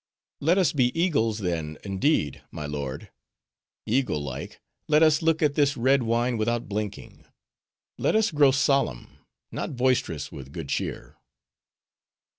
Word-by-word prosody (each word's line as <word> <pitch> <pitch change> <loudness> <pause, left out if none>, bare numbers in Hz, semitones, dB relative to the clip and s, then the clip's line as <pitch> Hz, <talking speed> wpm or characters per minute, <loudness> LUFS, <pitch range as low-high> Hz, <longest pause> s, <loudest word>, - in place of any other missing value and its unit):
"Let 165 +6 +2
us 185 -4 +3
be 130 +2 +1
eagles, 115 - +1
then, 80 -6 -3
indeed, 95 - 0
my 75 -3 -6
lord: 70 -3 -5 0.7
eagle 125 - +1
like, 65 -3 -6 0.3
let 150 +1 +5
us 155 0 +4
look 160 -1 +2
at 145 -2 +3
this 140 -1 +2
red 130 +3 +3
wine 120 +1 0
without 120 +2 -1
blinking; 105 0 -5 0.7
let - - +1
us 220 -2 +3
grow 145 -2 +5
solemn, 135 - 0 0.3
not - - -4
boisterous, 105 - 0
with 70 +1 -10
good 80 -5 -6
cheer." - - -4
120 Hz, 135 wpm, -26 LUFS, -, 0.7 s, let